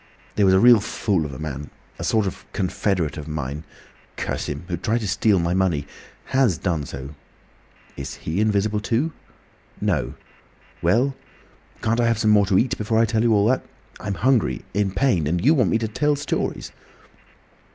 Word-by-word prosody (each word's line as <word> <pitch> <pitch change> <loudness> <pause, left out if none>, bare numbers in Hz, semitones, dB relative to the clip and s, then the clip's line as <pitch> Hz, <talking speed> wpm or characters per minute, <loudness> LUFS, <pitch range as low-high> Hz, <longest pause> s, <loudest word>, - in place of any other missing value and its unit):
"There 100 -2 +3
was 95 - +5
a - - +5
real 120 0 +7
fool 100 -5 -1
of - - -9
a 65 - -8
man—a 75 -2 -8
sort 110 -2 +2
of 95 - -5
confederate 90 -3 -1
of 75 -1 -7
mine—curse 75 0 -6
him!—who 85 +5 -4
tried 110 +7 0
to 105 - -3
steal 100 +1 +2
my 85 0 0
money. 90 -6 +1 0.5
Has 130 -10 +3
done 80 -6 -2
so." 70 +1 -7 0.8
"Is 70 0 -6
he 85 +6 -2
invisible 105 0 +1
too?" 120 +9 0 0.7
"No." - - -1 0.7
"Well?" 120 +11 +2 0.7
"Can't 115 +2 +1
I 120 - +3
have 115 -1 +2
some 110 -1 +3
more 100 -2 +5
to 95 -1 +3
eat 130 +3 +1
before 110 +1 0
I 115 - +5
tell 110 0 0
you 115 0 +3
all 105 -2 +4
that? 130 - +1 0.4
I'm 100 -1 -3
hungry—in 105 -5 +1
pain. 100 - +2
And 85 +6 -1
you 150 - +6
want 125 - +3
me - - +2
to 115 -1 -2
tell 145 +7 +1
stories!" 145 0 -3
100 Hz, 170 wpm, -23 LUFS, 85-115 Hz, 0.8 s, real